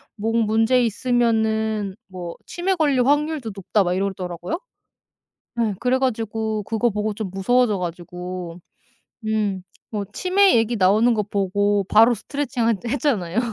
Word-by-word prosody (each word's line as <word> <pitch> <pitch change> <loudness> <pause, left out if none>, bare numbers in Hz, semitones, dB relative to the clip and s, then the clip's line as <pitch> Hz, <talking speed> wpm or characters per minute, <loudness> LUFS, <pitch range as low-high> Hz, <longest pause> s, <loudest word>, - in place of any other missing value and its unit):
"목 225 +2 -2
문제 225 +4 +3
있으면은 220 -3 0
뭐 180 -3 -7
치매 375 +2 -1
걸릴 285 -7 +2
확률도 290 -3 +1
높다." 200 +1 +1
막 180 - 0
이러더라고요. 185 - -3 1.0
예. 215 -3 0
그래 250 +2 +2
가지고 220 -3 -1
그거 225 +3 0
보고 210 0 -2
좀 210 -1 -5
무서워져 215 +3 +2
가지고 180 0 -6 0.7
음 210 -4 0 0.3
뭐 205 -1 -2
치매 380 - +3
얘기 230 +1 +1
나오는 210 +5 +4
거 215 -2 +1
보고 200 0 0
바로 225 +4 +5
스트레칭 260 +2 -3 0.2
핬 235 - -5
했잖아요. 230 - 0
220 Hz, 290 characters per minute, -22 LUFS, 195-245 Hz, 1.0 s, 바로